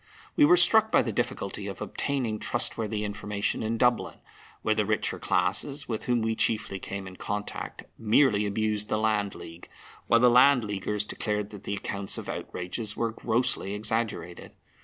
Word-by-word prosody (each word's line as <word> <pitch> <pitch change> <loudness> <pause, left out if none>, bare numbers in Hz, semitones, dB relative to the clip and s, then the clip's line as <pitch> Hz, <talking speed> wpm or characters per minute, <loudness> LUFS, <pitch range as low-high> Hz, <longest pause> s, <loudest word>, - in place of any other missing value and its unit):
We 300 - +6
were 350 +4 +6
struck 220 -7 +5
by - - +5
the - - -2
difficulty - - -3
of - - -6
obtaining 125 -7 -2
trustworthy 105 -1 -1
information 105 0 -2
in 115 +1 -1
Dublin, 125 +1 +1 0.5
where 110 - +3
the 110 0 +1
richer 105 +1 -1
classes, 100 +11 -1
with 110 -3 -3
whom 120 -2 +1
we 110 0 0
chiefly 110 -3 -1
came 100 +1 -6
in 95 0 -10
contact, 105 0 -5 0.2
merely 110 -1 +3
abused 105 0 -1
the - - +1
Land 105 -2 0
League, 85 +1 -11 0.4
while 115 - +5
the 125 - +6
Land 125 +1 +6
Leaguers 105 0 -2
declared 105 -1 -3
that 105 -2 -11
the 100 - -2
accounts 100 0 -2
of - - -6
outrages 105 +4 -5
were 115 -1 0
grossly 115 -3 0
exaggerated. 110 -4 -3
110 Hz, 165 wpm, -27 LUFS, 100-115 Hz, 0.5 s, We